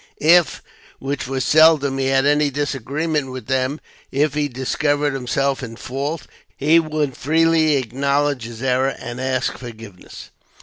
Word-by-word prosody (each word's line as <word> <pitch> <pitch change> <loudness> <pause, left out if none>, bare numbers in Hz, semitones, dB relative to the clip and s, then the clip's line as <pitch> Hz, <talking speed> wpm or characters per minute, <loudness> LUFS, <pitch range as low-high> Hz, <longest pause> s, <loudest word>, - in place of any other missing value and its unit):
If, 170 +2 +3 0.3
which 135 -1 -4
was 130 -1 -2
seldom, 150 -4 +4
he 135 - 0
had 135 0 +2
any 145 0 +3
disagreement 145 +1 -2
with 130 -3 -7
them, 130 +3 -1 0.3
if 145 +1 +1
he 150 0 0
discovered 145 +2 -1
himself 135 +1 -1
in 115 -3 -7
fault, 140 +6 -4 0.3
he 155 +4 +4
would 155 -4 -2
freely 160 +1 +2
acknowledge 140 +1 0
his 115 +1 -8
error, 130 +1 +1
and 120 +2 -6
ask 130 -1 -1
forgiveness. 110 -6 -11
140 Hz, 140 wpm, -20 LUFS, 130-150 Hz, 0.3 s, seldom